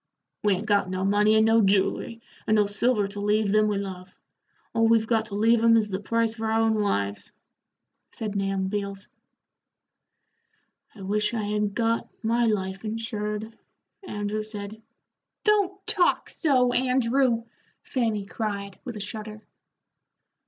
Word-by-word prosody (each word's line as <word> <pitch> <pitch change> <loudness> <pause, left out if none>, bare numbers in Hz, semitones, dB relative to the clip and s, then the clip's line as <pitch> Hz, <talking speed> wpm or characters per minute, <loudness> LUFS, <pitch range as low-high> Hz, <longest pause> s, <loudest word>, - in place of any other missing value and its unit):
"We 205 -2 +3
ain't 195 +4 -5
got 205 -3 +2
no 185 +1 -2
money 210 +2 +3
and 220 0 +5
no 225 0 +5
jewelry, 205 +4 +1 0.2
and 215 - +3
no 210 -1 +4
silver 210 +1 +1
to 205 0 -7
leave 210 0 +1
them 215 0 +4
we 205 -1 0
love 185 -2 -6 0.6
all 225 0 +3
we've 225 -1 +4
got 225 -1 +1
to 210 -2 -7
leave 225 +2 +3
'em 230 0 +6
is 215 -2 +1
the 190 -1 -3
price 230 +2 0
of 225 - -11
our 220 0 0
own 225 0 +3
lives," 100 - -1 0.8
said 210 -2 -5
Nahum 195 -1 -1
Beals. 200 0 -4 1.9
"I 195 - -10
wish 210 +3 0
I 220 - -1
had 210 0 -1
got 230 0 0
my 235 +2 +2
life 190 -2 -2
insured," 220 0 -4 0.5
Andrew 210 - -3
said. 215 0 -7 0.6
"Don't 395 -2 +1
talk 415 -5 +2
so, 255 -6 +2
Andrew," 250 -1 +2 0.4
Fanny 225 -6 -1
cried, 200 -2 -4
with 245 -4 -6
a - - -6
shudder. 215 +1 -7
215 Hz, 150 wpm, -26 LUFS, 205-230 Hz, 1.9 s, em